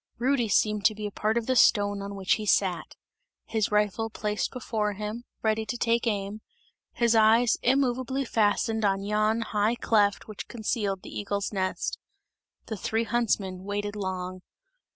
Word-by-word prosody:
Rudy 250 -1 +1
seemed 210 0 +2
to 215 - +4
be 210 0 -5
a 205 - -3
part 215 +3 0
of 235 - -1
the 255 - +1
stone 205 -4 +4
on 200 0 -6
which 190 -2 +1
he 215 - -2
sat; 185 -3 +1 0.5
his 220 -2 -1
rifle 210 +1 +1
placed 210 -1 -2
before 220 -4 -2
him, 210 +4 -5 0.2
ready 220 0 +1
to 240 - -3
take 235 +1 +1
aim, 205 0 -2 0.5
his 235 -1 +2
eyes 225 +1 +4
immoveably 260 +1 +1
fastened 220 0 +1
on 195 -1 +1
yon 215 +2 +1
high 215 +1 +1
cleft 205 -4 +1
which 215 -2 -7
concealed 210 -4 -2
the - - -9
eagle's 200 0 -2
nest. 185 -1 -2 0.7
The 220 - -5
three 225 +4 -1
huntsmen 205 -6 -1
waited 205 +1 -3
long. 185 -2 -4
215 Hz, 160 wpm, -27 LUFS, 205-230 Hz, 0.7 s, to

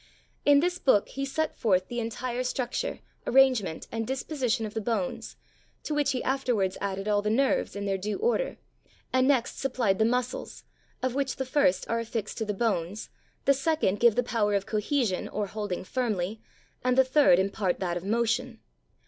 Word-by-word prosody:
In 285 0 +6
this 360 +1 0
book 210 -7 +3
he 275 0 -3
set 315 +3 -2
forth 185 -4 +1
the 240 - -3
entire 240 +2 -3
structure, 255 - -2 0.3
arrangement, 250 -10 +3
and 225 -1 -3
disposition 260 -3 -1
of 210 - -6
the 220 - -2
bones, 210 -4 -2 0.5
to 305 - -3
which 295 -1 +1
he 255 - -2
afterwards 245 -8 0
added 195 0 -3
all 205 -1 +2
the 210 - -1
nerves, 265 +1 +1
in 200 0 -4
their 195 -1 -1
due 210 +3 -2
order, 480 +3 0 0.6
and 255 0 +4
next 260 -4 +1
supplied 240 -7 0
the - - +5
muscles, 250 +1 -2 0.4
of 255 -1 0
which 275 0 -1
the 265 - -3
first 280 +1 +2
are 230 - 0
affixed 230 -1 -4
to 220 - -1
the 210 - -1
bones, 195 -2 -2 0.3
the 280 - +6
second 275 - 0
give 235 -3 +5
the 245 - +2
power 210 -4 +1
of 200 -1 0
cohesion 215 -2 0
or 210 - -2
holding 205 -2 -4
firmly, 215 -3 -2 0.4
and 255 0 +2
the 265 - +7
third 265 -8 +5
impart 190 0 0
that 175 -2 -1
of 175 - -4
motion. 235 +3 0
235 Hz, 180 wpm, -28 LUFS, 205-265 Hz, 0.6 s, the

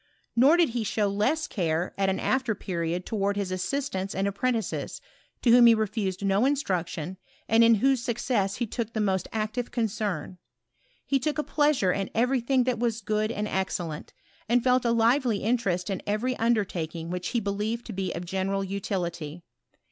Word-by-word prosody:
Nor 275 +8 +6
did 345 -5 +4
he 235 -1 -2
show 210 0 0
less 210 +11 +1
care 170 -1 -1
at 195 -1 +1
an 190 - -1
after 260 -4 0
period 175 -2 -3
towards 200 -2 -1
his 195 -2 -2
assistants 190 0 -2
and 195 +1 0
apprentices, 225 +3 -2 0.4
to 235 - +5
whom 240 0 +8
he 230 - +7
refused 205 -3 -2
no 195 +3 +3
instruction, 185 - -1 0.3
and 225 +1 +5
in 230 0 +6
whose 265 +3 +2
success 235 -5 0
he 240 - -1
took 230 0 -4
the 220 - -2
most 190 -3 0
active 220 +3 -2
concern. 205 - -2 0.7
He 275 - +1
took 300 +4 -1
a 300 - 0
pleasure 290 -12 +2
in 195 +1 -2
every 250 +3 +2
thing 255 +1 +2
that 250 -2 -1
was 230 -2 0
good 215 +1 -1
and 210 -2 -2
excellent, 180 -5 -3 0.4
and 240 0 +3
felt 255 -1 +3
a 235 - +3
lively 235 -1 +2
interest 200 -6 0
in 195 -2 -3
every 225 +5 0
under 225 -2 +2
taking 165 -1 -5
which 180 0 -3
he 240 - 0
believed 210 +3 -2
to 225 - -6
be 190 0 -2
of 175 - -5
general 195 +2 -1
utility. 175 -5 -4
215 Hz, 180 wpm, -27 LUFS, 190-240 Hz, 0.7 s, whom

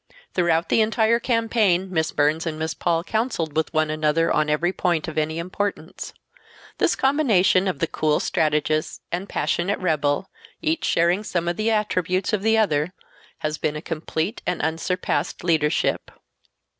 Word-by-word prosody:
Throughout 170 -2 +1
the - - +4
entire 220 +1 +2
campaign 220 -6 +1
Miss 160 -2 +1
Burns 155 +3 +1
and 155 -1 -3
Miss 160 0 -2
Paul 170 -1 0
counseled 205 - -2
with 160 -1 0
one 155 -1 +1
another 155 +2 +1
on 155 0 +1
every 170 +5 +1
point 175 -5 0
of 160 - -6
any 155 +1 -1
importance. 185 +4 -4 0.7
This - - +3
combination 215 -10 +3
of 185 - -1
the 165 - +1
cool 155 -1 0
strategist 155 0 0
and 180 +3 -3
passionate 185 +4 0
rebel—each 160 - -2
sharing 175 +5 +2
some 175 -4 -2
of 175 - 0
the 215 +3 0
attributes 190 -3 0
of 210 - +1
the 220 +1 +3
other 170 -5 +1 0.5
has 155 0 -2
been 150 - -1
a - - -3
complete 165 +5 -3
and - - 0
unsurpassed 165 0 -2
leadership. 160 -3 +1
170 Hz, 155 wpm, -23 LUFS, 155-200 Hz, 0.7 s, the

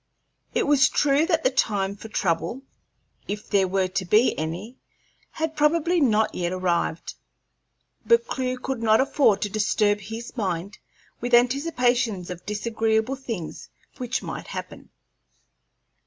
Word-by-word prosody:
It - - +2
was 280 -2 +5
true 295 +2 +2
that 325 -3 +1
the 260 - +3
time 200 -6 0
for 215 - -10
trouble, 205 +5 -1 0.6
if 210 +1 -5
there 195 -2 +2
were 190 0 +1
to 185 +1 -2
be 210 +7 +3
any, 170 +11 -5 0.5
had 320 0 -3
probably 335 +3 +2
not 220 -5 +3
yet 175 -1 -2
arrived, 175 -3 -1 0.9
but 470 0 +4
Clewe 255 - -2
could 255 -1 -4
not 220 -1 +4
afford 265 -6 +3
to 205 - -2
disturb 210 0 +1
his 225 +5 -8
mind 195 -3 -3 0.4
with 245 0 +2
anticipations 245 - +1
of 180 0 -9
disagreeable 220 +3 0
things 230 -11 -6 0.3
which - - -2
might - - -6
happen. - - -8
220 Hz, 135 wpm, -24 LUFS, 195-265 Hz, 0.9 s, was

